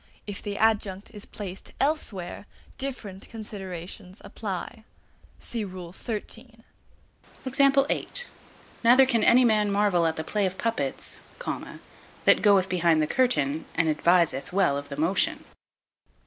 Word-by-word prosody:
If 205 -1 -6
the 205 -1 -4
adjunct 210 -3 0
is 205 -2 -9
placed 195 -3 -8
elsewhere, 205 - -2 0.3
different 220 -8 -6
considerations 190 -3 -8
apply. 215 +2 -6 0.5
See 230 -2 -2
Rule 180 -3 -8
XIII. 230 +2 -7 0.8
(3). 275 +1 +3 0.8
Neither 250 +3 +7
can 235 -4 +1
any 250 +1 +6
man 210 -3 +3
marvel 200 -4 +3
at 160 - -1
the 160 - -4
play 205 +4 0
of 185 +1 -6
puppets, 225 - -2 1.0
that - - +6
goeth 200 -3 +5
behind 170 -3 +2
the 155 - +3
curtain 160 - +1
and 165 -1 +2
adviseth 160 -2 +2
well 180 -7 +2
of 140 0 -5
the 140 - -6
motion. 165 +6 +1
200 Hz, 125 wpm, -26 LUFS, 175-225 Hz, 1.0 s, Neither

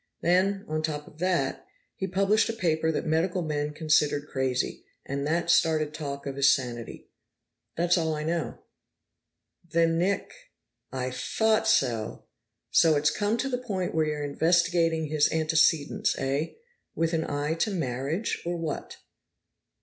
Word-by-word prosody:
Then, 190 +3 +2
on 155 0 -1
top 150 -2 -3
of 155 - -17
that, 180 0 0 0.3
he 190 - -3
published 195 +4 +2
a - - -1
paper 160 -6 +1
that - - -2
medical 170 +3 +1
men 150 -1 -2
considered 150 -1 +1
crazy, 130 -2 -1 0.2
and 140 +1 -3
that 170 +2 +1
started 155 -2 +2
talk 140 -3 -5
of 135 -1 -5
his 140 0 +6
sanity. 120 -4 -7 0.7
That's 175 +1 +3
all 160 -1 0
I 150 - -4
know." 165 +1 -3 1.0
"Then 165 -1 +1
Nick 195 +3 0 0.3
." - - -55 0.2
"I 130 -1 -3
thought 220 - +1
so! 120 - +1 0.5
So 160 -2 +5
it's 150 +1 +3
come 210 +5 0
to 270 - -1
the 250 -2 -2
point 195 -7 -3
where 160 -1 +1
you're 150 -1 -2
investigating 165 +2 +2
his 150 0 +2
antecedents, 155 -1 +2
eh? 140 +4 -1 0.4
With 165 +1 0
an 160 -1 -1
eye 145 +2 -1
to 215 - +2
marriage, 150 - -2
or 175 0 -2
what?" 165 -2 -5
160 Hz, 150 wpm, -27 LUFS, 145-175 Hz, 1.0 s, his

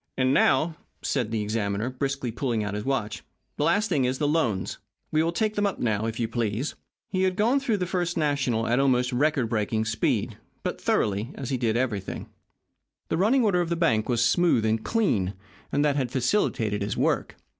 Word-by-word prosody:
"And 130 0 +3
now," 155 +4 +3 0.3
said 125 -6 0
the 110 -2 -1
examiner, 105 +2 -1
briskly, 135 -1 -2
pulling 120 -2 -1
out 105 -1 -3
his 105 0 -3
watch, 110 -5 -2 0.4
"the - - +1
last 210 +2 +2
thing 135 -9 +1
is 130 +1 0
the 145 - 0
loans. 125 - 0 0.3
We 155 - +3
will 165 +1 +1
take 215 +4 0
them 205 -1 +1
up 200 - -3
now, 110 -2 0
if 115 +1 -4
you 115 - +1
please." 115 +3 -2 0.4
He 185 -1 0
had 185 -1 +2
gone 230 +7 +3
through 240 -6 0
the 180 - -1
First 175 -1 -1
National 140 -7 +1
at 120 +3 +2
almost 125 -2 +2
record 140 -1 +2
breaking 110 0 0
speed 110 0 -1 0.2
but - - -3
thoroughly, 105 +3 +1
as 135 -1 -5
he 130 - +1
did 115 -2 +1
everything. 115 -7 -2 0.8
The - - 0
running 230 +8 +3
order 190 -5 +3
of 170 - -2
the 170 - +1
bank 120 -11 +1
was 120 -1 +2
smooth 170 -10 +3
and 110 0 +1
clean, 105 - +1 0.4
and 145 +1 +2
that 145 -1 +2
had 130 -3 0
facilitated 120 - 0
his 100 +1 -2
work. - - 0
130 Hz, 200 wpm, -26 LUFS, 110-165 Hz, 0.8 s, And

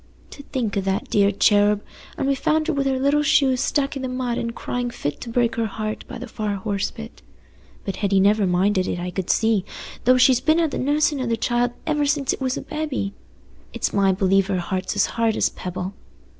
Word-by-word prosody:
To - - -10
think 250 -7 -3
o' 200 - +1
that 195 0 -2
dear 200 -1 +4
cherub! 205 +1 +3 0.3
And - - -1
we 275 - +3
found 310 +3 +1
her 330 - 0
wi' 280 -1 0
her 265 -1 +1
little 280 +3 +2
shoes 275 -4 +3
stuck 280 0 0
i' - - -3
the 260 - -3
mud 250 -1 -2
an' 235 - -2
crying 245 +1 -3
fit 145 -10 -4
to 240 - -6
break 235 0 +1
her 230 -1 +1
heart 215 +1 -5
by 255 - -7
the 250 +2 -7
far 215 -2 -3
horse 200 0 -2
pit. 225 0 -11 0.6
But 195 - -3
Hetty 200 -2 +2
never 200 +1 +3
minded 185 +1 +2
it, - - -2
I 180 +1 -4
could 185 -1 -4
see, 220 -4 +2 0.4
though 255 +1 +6
she's 255 -1 +5
been 315 +1 +3
at 325 -3 +1
the - - -3
nussin' 290 +1 +1
o' 255 - -2
the 230 -1 0
child 240 +1 0
ever 300 -2 +1
since 280 -2 +1
it - - -8
was 260 -1 -1
a - - -4
babby. 295 -10 -3 0.6
It's - - -2
my 195 -1 +3
belief 190 0 +2
her 195 -2 0
heart's 185 +3 -3
as 205 - +3
hard 230 -1 0
as - - +2
a - - -23
pebble." 185 +1 -5
230 Hz, 230 wpm, -22 LUFS, 200-265 Hz, 0.6 s, though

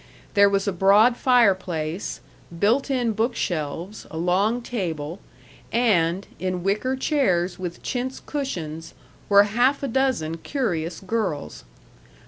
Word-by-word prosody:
There 200 -1 +6
was 195 0 0
a 200 - +1
broad 200 +6 +5
fireplace, 185 -10 +1 0.4
built 230 +10 +2
in 250 -4 +1
book 225 +3 0
shelves, 170 +4 -4
a 160 - -7
long 195 +8 +1
table; 170 -7 -4 0.5
and, 195 -6 +2
in 185 -1 -2
wicker 210 +7 0
chairs 190 - 0
with 180 -2 -6
chintz 255 +1 -3
cushions, 165 - -5 0.3
were 200 0 +7
half 245 +7 +1
a - - 0
dozen 240 -11 0
curious 175 - -3
girls. 190 - -3
200 Hz, 120 wpm, -24 LUFS, 175-245 Hz, 0.5 s, were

